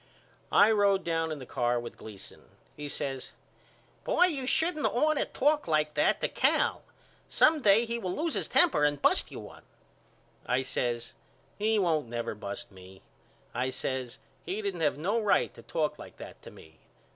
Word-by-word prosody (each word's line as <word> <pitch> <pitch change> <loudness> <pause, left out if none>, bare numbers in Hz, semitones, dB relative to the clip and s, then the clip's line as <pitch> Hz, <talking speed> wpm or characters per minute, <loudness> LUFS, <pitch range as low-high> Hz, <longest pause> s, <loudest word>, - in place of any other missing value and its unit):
I 210 +2 +6
road 200 -2 +3
down 165 -1 -1
in 155 - -4
the 130 - -9
car 120 0 0
with 120 0 -8
Gleason. 105 -3 -11 0.3
He 150 0 -6
says 135 -2 -4 0.7
Boy 360 - +4
you 280 -8 -1
shouldn't 320 +2 +1
ought 305 +6 +2
to - - +1
talk 295 -1 +1
like 155 -1 +1
that - - +2
to - - +2
Cal. - - +1 0.5
Some 310 -1 +4
day 215 +1 +5
he 235 0 -3
will 185 -4 -3
lose 320 +2 -1
his - - 0
temper 330 - +4
and 145 -1 +2
bust - - +2
you - - -8
one. - - -11 0.8
I 125 +2 0
says 120 -1 -2 0.5
He 220 +1 +2
won't 160 - +1
never 120 0 -3
bust 105 +3 -7
me. 95 0 -15 0.5
I 125 +2 -1
says 130 -1 -3 0.3
He 210 +3 -4
didn't 190 -4 -3
have 150 -2 +1
no 200 +9 0
right 210 - +2
to - - -13
talk 155 -3 -2
like - - -11
that - - -11
to - - -11
me. 80 0 -17
160 Hz, 180 wpm, -29 LUFS, -, 0.8 s, I